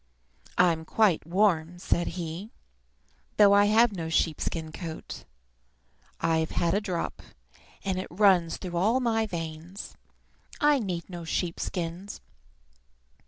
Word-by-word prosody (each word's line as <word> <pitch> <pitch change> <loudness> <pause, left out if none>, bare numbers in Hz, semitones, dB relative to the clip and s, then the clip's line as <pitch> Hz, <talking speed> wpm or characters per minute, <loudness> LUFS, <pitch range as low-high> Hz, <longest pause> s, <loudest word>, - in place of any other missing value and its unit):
I 180 -1 +6
"I'm 160 -1 -3
quite 185 -2 +2
warm," 175 -2 +2
said 175 -1 0
he, 175 +4 -5 0.9
"though 205 -1 +7
I 205 0 +6
have 220 +3 +5
no 165 -5 -4
sheep 160 -1 +1
skin 160 -2 -3
coat. 160 -1 -7 0.9
I've 160 -1 +1
had 170 -1 0
a 205 - +1
drop, 185 -5 -3 0.6
and 190 -1 0
it 185 - -4
runs 180 -3 +3
through 175 -2 -5
all 220 +8 +3
my 225 -3 +1
veins. 165 +1 -6 0.6
I 295 -2 +4
need 180 -7 -3
no 175 -2 -7
sheep 165 +1 -2
skins. 180 +3 -4
180 Hz, 130 wpm, -27 LUFS, 165-205 Hz, 0.9 s, though